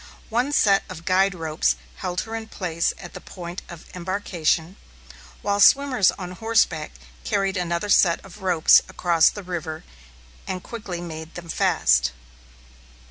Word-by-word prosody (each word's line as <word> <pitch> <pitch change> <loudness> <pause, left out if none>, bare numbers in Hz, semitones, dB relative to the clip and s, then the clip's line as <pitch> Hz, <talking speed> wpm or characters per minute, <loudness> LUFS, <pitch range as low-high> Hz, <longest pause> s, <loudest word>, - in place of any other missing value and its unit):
One 245 +5 0
set 200 -8 +4
of 165 - -9
guide 190 +1 +3
ropes 160 -1 0 0.2
held 180 -1 -2
her 225 - -8
in 225 -1 -5
place 170 -6 -1
at 175 - -10
the - - -9
point 175 0 -8
of 175 -2 -10
embarkation, 180 -2 -1 0.7
while 200 0 0
swimmers 255 -3 +5
on 180 -2 -6
horseback 185 -6 0 0.3
carried 195 - 0
another 175 +2 -2
set 175 -4 +4
of 195 +2 -13
ropes 180 -4 +5
across 170 -3 +3
the 205 - -8
river 170 -3 -5 0.6
and 185 -1 -4
quickly 200 -7 -6
made 160 -1 -8
them 170 -1 -9
fast. 65 - +2
180 Hz, 140 wpm, -23 LUFS, 170-200 Hz, 0.7 s, swimmers